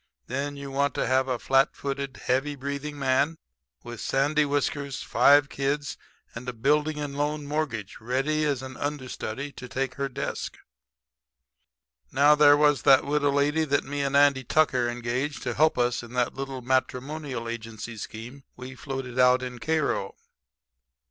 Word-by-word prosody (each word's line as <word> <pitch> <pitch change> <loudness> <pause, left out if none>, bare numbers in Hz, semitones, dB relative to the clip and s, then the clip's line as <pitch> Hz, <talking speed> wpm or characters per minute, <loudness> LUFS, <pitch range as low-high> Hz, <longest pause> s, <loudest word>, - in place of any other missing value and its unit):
Then 140 +3 -3
you 140 -1 -7
want 140 +1 0
to - - 0
have 130 0 +2
a 130 -2 0
flat 135 +3 +2
footed, 140 -1 -4
heavy 135 +3 +1
breathing 140 +2 -5
man 140 +4 +1 0.5
with 120 -1 -8
sandy 145 +3 +2
whiskers, 140 -1 -2
five 145 0 +5
kids 145 +1 -2 0.4
and 125 +2 -6
a - - -5
building 150 +6 +1
and 145 -1 -4
loan 150 +1 -1
mortgage 140 -9 -3
ready 135 +6 0
as 140 -4 0
an 130 0 -8
understudy 140 -2 -4
to 125 -2 -10
take 135 +1 -2
her 140 - 0
desk. 135 +2 -4 1.5
Now 145 +2 +6
there 145 -1 +6
was 145 -4 +3
that 135 -1 +6
widow 145 0 +1
lady 145 +3 +2
that 145 -2 +1
me 145 +1 -3
and 140 0 +1
Andy 140 -2 +4
Tucker 130 -4 +2
engaged 120 +4 -3
to 125 - -2
help 155 +5 +3
us 125 0 +1
in 120 0 -11
that 125 -1 0
little 135 -2 -6
matrimonial 130 0 -2
agency 115 0 -6
scheme 115 +5 -8
we 125 +1 -8
floated 130 -2 -5
out 125 0 +5
in 125 -1 -6
Cairo. 155 -11 -1
135 Hz, 160 wpm, -26 LUFS, 125-145 Hz, 1.5 s, Now